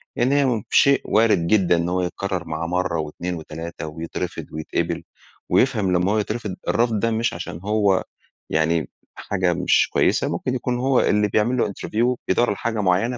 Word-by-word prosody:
لإن 125 +2 +1
هي 140 0 +3
م 120 -5 0
شيء 140 0 +4
وارد 105 -6 +3
جدًا 90 -3 +3
إن 85 +1 -1
هو 90 +1 0
يتكرر 90 0 -3
معاه 80 +1 -3
مرة 90 -1 -1
و2 85 +4 -4
و3 80 0 -7
ويترفض 80 +1 -5
ويتقبل، 85 +2 -3 0.5
ويفهم 110 -8 +2
لمّا 90 +2 +2
هو 110 - +2
يترفض 105 -2 -3
الرفض 115 0 +1
ده 115 +2 +1
مش 115 +1 0
عشان 85 - -6
هو 100 -2 +2 0.5
يعني 80 0 +1 0.3
حاجة 95 -3 -1
مش 90 +2 +2
كويسة، - - +2
ممكن 130 - -2
يكون 125 0 -1
هو 130 +1 +2
اللي 105 0 +2
بيعمل 110 +5 +1
له 120 - +2
interview 115 +5 -1
بيدوَّر 120 - +2
على 105 - -2
حاجة 115 -2 -2
مُعيّنة 100 +6 +1
100 Hz, 180 wpm, -22 LUFS, 85-115 Hz, 0.5 s, شيء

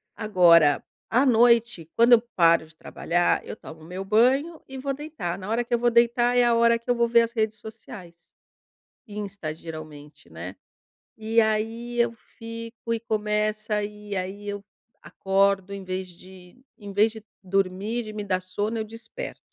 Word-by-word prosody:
Agora, 170 -8 +4 0.3
à 250 +5 +3
noite, 235 - +3
quando 235 +1 +6
eu 230 - +7
paro 165 -2 +4
de 155 - -22
trabalhar 175 +2 0
eu - - -7
tomo 160 -6 -12
o - - -13
meu 185 +3 -6
banho 260 - +2
e 265 - -8
vou 275 +1 -2
deitar, 280 - -5
na 190 +1 -7
hora 230 +2 +1
que 240 +1 -5
eu 240 - +3
vou 240 0 +3
deitar 240 +1 +3
é 245 - +5
a 240 -1 +3
hora 235 0 +4
que 235 +2 -15
eu 245 - +3
vou 235 0 +2
ver 235 0 +5
as 230 0 -1
redes 220 -2 -1
sociais. 215 -6 -12 0.8
Insta, 200 -6 -6
geralmente, 155 - -11
né. 85 +4 -8 0.6
E 220 +1 +2
aí 225 +2 -1
eu 235 -1 +2 0.3
fico 230 0 -7
e 230 - -1
começa, 215 -1 -1
e 210 0 -7
aí 195 +2 -5
eu 205 0 -4 0.4
acordo 195 0 0
em 200 0 -6
vez 185 0 -4
de 185 +5 -16
em 205 -2 -9
vez 210 +3 +3
de 220 -1 -11 0.2
dormir 195 +4 -1
e 215 - -7
me 210 0 -5
dá 190 -2 0
sono, 205 +4 -3
eu 220 - -2
desperto. 230 - -9
215 Hz, 180 wpm, -25 LUFS, 185-235 Hz, 0.8 s, eu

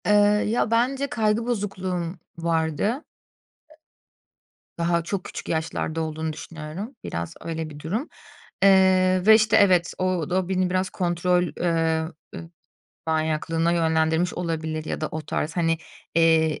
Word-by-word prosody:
Eee, 210 - +4 0.3
ya, 225 +1 0
bence 260 +4 +1
kaygı 220 -2 0
bozukluğum 185 -6 -2 0.2
vardı. 165 - 0 1.7
I - - -66
Daha 170 0 +1
çok 185 +2 -3
küçük - - -8
yaşlarda 160 0 -2
olduğunu 160 0 -3
düşünüyorum. 165 - -7
Biraz 85 0 -4
öyle 160 -1 -4
bir 145 -1 -10
durum, 210 - -3 0.5
eee, 185 -1 +5
ve, 220 +1 +9
işte, 220 0 +4
evet, 180 -3 +4
o 185 -3 -1
d - - -3
o 185 -1 0
beni 185 -1 +1
biraz 185 +1 0
kontrol, 180 0 +1
eee, 165 -2 +1 0.3
eee, 165 - -8 0.6
manyaklığına 160 +1 0
yönlendirmiş 160 0 +1
olabilir 160 -2 -3
ya - - -4
da 155 - -1
o 155 - -3
tarz 155 +1 -3
hani, 165 -1 +1 0.4
eee, 160 -1 +4
i - - -13
170 Hz, 140 wpm, -24 LUFS, 160-190 Hz, 1.7 s, ve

